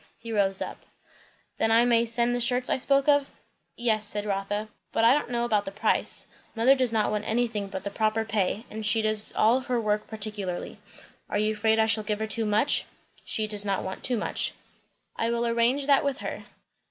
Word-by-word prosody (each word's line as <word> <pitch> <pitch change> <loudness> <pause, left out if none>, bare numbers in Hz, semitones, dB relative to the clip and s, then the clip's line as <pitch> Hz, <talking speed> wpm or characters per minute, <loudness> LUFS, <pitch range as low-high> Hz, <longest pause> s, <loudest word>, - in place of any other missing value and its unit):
He 230 - -9
rose 195 -2 +1
up. - - -8 0.8
"Then 225 - +1
I 230 +2 +4
may 235 -1 +2
send 235 +1 +2
the 245 - -1
shirts 250 +1 +3
I - - +3
spoke 275 +2 +3
of?" 285 -1 +3 0.5
"Yes," 220 -3 +1
said 210 0 -1
Rotha; 205 +1 -3 0.2
"but 225 - 0
I 230 - +6
don't 290 -3 -1
know 240 -1 -1
about 215 -4 +1
the 195 - -7
price. 215 +2 -1 0.3
Mother 235 +4 +5
does 255 -3 0
not 220 -2 0
want 210 0 -3
anything 225 -3 -1
but 190 -1 -7
the 200 - -4
proper 220 +1 0
pay; 215 +1 -1
and 220 +1 -6
she 220 +1 +3
does 215 -1 +2
all 230 +4 +3
her 250 -2 -2
work 210 -1 -1
particularly." 210 -4 -4 0.5
"Are - - -1
you 215 +1 +1
afraid 220 +1 +1
I 220 - +3
shall 220 -1 +3
give 210 0 -2
her 220 - -3
too 225 +1 -2
much?" 215 +7 +3 0.4
"She 215 - 0
does 210 -1 -1
not 195 -2 -2
want 190 - -7
too 250 -2 0
much." - - -1 0.6
"I 230 - -1
will 235 0 -1
arrange 235 +4 +1
that 280 -1 +3
with 280 -2 -1
her. - - -7
220 Hz, 210 wpm, -26 LUFS, 210-240 Hz, 0.8 s, I